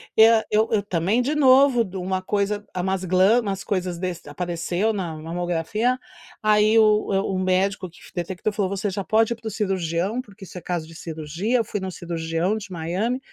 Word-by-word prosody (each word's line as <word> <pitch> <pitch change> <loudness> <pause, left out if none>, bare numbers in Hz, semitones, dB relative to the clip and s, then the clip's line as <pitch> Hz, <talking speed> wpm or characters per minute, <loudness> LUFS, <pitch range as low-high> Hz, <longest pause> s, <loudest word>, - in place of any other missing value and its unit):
eu 220 0 +6 0.3
eu 210 -3 +2
também 200 +5 +1
de 285 - 0
novo 265 -3 +5
de 195 -2 -7
uma 185 +1 -2
coisa 205 +2 -1
umas 190 +1 -1
glamas 185 +6 +4
umas 195 -4 -3
coisas 180 -3 -2
desas 180 -2 -5
apareceu 175 +6 -1
na 175 -5 -3
mamografia, 175 +8 -1 0.5
aí, 215 +1 +4
o 215 -1 +4 0.3
o - - -1
médico 185 +1 0
que 170 - -20 0.2
detectou 185 +4 -3
falou: 200 -3 0
"Você 200 +1 -2
já 195 +1 -3
pode 225 +3 +2
ir - - -8
para 230 - -8
o 220 - -3
cirurgião, 190 +1 -1
porque 200 -5 -15
isso 180 - -11
é - - -17
caso 175 -3 -3
de 165 - -13
cirurgia." 165 +8 -2
Eu 230 - +2
fui 205 - -3
no 190 0 -4
cirurgião 170 +2 -2
de 205 -3 -7
Miami, 185 +9 -2
190 Hz, 190 wpm, -23 LUFS, 175-215 Hz, 0.5 s, eu